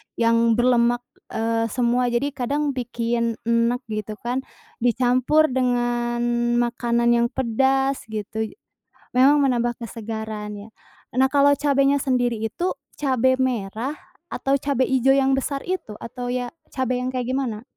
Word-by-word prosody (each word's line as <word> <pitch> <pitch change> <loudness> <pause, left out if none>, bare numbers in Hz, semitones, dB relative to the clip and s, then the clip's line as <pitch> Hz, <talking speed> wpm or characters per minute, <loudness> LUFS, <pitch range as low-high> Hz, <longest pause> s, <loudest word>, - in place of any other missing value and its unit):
yang 230 0 +3
berlemak, 240 0 +3 0.3
eee, 225 0 0
semua, 245 +2 +1
jadi 245 +4 0
kadang 285 +3 -1
bikin 235 -2 -1
enek 235 +2 +1
gitu 215 0 -4
kan. 245 +2 -1 0.4
Dicampur 255 +5 +3
dengan 240 -1 0 0.4
makanan 235 0 0
yang 235 0 +3
pedas 265 +2 0
gitu. 220 0 -4 0.6
Memang 270 +4 +5
menambah 240 -3 +1
kesegaran 220 -2 -6
ya. 205 +2 -10 0.5
Nah, 265 +1 +4
kalau 285 0 +5
cabenya 280 0 +2
sendiri 245 -3 +1
itu 285 - -2 0.3
cabe 260 -2 +2
merah, 245 +2 -1 0.3
atau 275 0 0
cabe 275 -2 +1
hijau 265 +1 +3
yang 270 0 +3
besar 275 +1 -2
itu, 360 - -4
atau 245 +1 -6
ya 245 0 -2 0.2
cabe 255 -1 -1
yang 250 - -2
kayak 255 0 -2
gimana? 245 -5 -2
245 Hz, 130 wpm, -23 LUFS, 230-265 Hz, 0.6 s, Memang